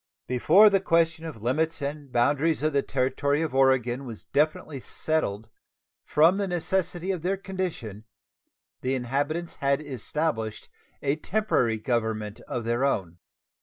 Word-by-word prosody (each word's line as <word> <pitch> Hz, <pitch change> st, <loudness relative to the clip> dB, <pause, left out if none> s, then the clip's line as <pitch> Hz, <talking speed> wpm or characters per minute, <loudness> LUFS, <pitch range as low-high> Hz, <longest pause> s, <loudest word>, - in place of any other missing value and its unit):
Before 160 Hz, -, +6 dB
the 195 Hz, -, +4 dB
question 165 Hz, -3 st, +1 dB
of 130 Hz, -10 st, -8 dB
limits 160 Hz, +7 st, 0 dB
and 145 Hz, -1 st, -5 dB
boundaries 145 Hz, +6 st, +2 dB
of 155 Hz, -1 st, +1 dB
the 140 Hz, -, +3 dB
Territory 140 Hz, +3 st, 0 dB
of 155 Hz, -, -3 dB
Oregon 130 Hz, -1 st, +2 dB
was 115 Hz, -5 st, -9 dB
definitely 150 Hz, -1 st, 0 dB
settled, 115 Hz, -8 st, -2 dB, 0.6 s
from 165 Hz, +5 st, +4 dB
the 200 Hz, -1 st, -1 dB
necessity 180 Hz, +1 st, -1 dB
of 180 Hz, -4 st, -3 dB
their 190 Hz, +4 st, 0 dB
condition 175 Hz, -, -5 dB, 0.8 s
the 130 Hz, +1 st, 0 dB
inhabitants 145 Hz, +7 st, -2 dB
had 140 Hz, -1 st, +1 dB
established 135 Hz, -4 st, -3 dB, 0.3 s
a 140 Hz, +1 st, +1 dB
temporary 160 Hz, -, +1 dB
government 110 Hz, -2 st, -2 dB
of 120 Hz, -, -3 dB
their 120 Hz, +3 st, 0 dB
own. 95 Hz, -11 st, -1 dB
140 Hz, 135 wpm, -26 LUFS, 120-165 Hz, 0.8 s, Before